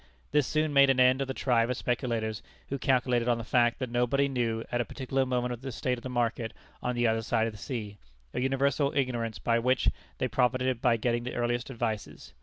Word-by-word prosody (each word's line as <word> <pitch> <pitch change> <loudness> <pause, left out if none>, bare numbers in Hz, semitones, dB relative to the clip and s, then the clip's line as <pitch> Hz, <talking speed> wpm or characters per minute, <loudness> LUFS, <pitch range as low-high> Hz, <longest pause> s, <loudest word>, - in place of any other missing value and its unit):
This 150 -2 +3
soon 155 -1 0
made 140 -1 +6
an 130 -1 +3
end 130 +1 +5
of 135 - -1
the 135 - -3
tribe 120 -2 +2
of 125 - -1
speculators 115 -3 -1 0.3
who 140 - -3
calculated 125 -2 +2
on 120 -1 +3
the 115 - -5
fact 120 0 +2
that 130 -2 -4
nobody 125 +3 +2
knew 115 -4 -1
at 120 - +1
a - - -2
particular 135 -1 -1
moment 125 -1 -1
the 135 0 -5
state 125 +1 -2
of - - -17
the 130 - -6
market 120 -2 -1 0.3
on 125 0 -1
the 120 0 +1
other 110 0 +2
side 110 0 +1
of 115 - -3
the 105 - -11
sea, 105 -7 -5 0.3
an - - -1
universal 140 +2 +1
ignorance 120 -6 -1
by 115 +5 +1
which 125 +2 +2 0.3
they 130 - 0
profited 125 +1 +1
by 120 -3 +3
getting 120 +1 0
the 125 - -5
earliest 120 +1 -1
advices. 115 -4 -4
125 Hz, 220 wpm, -29 LUFS, 115-130 Hz, 0.3 s, made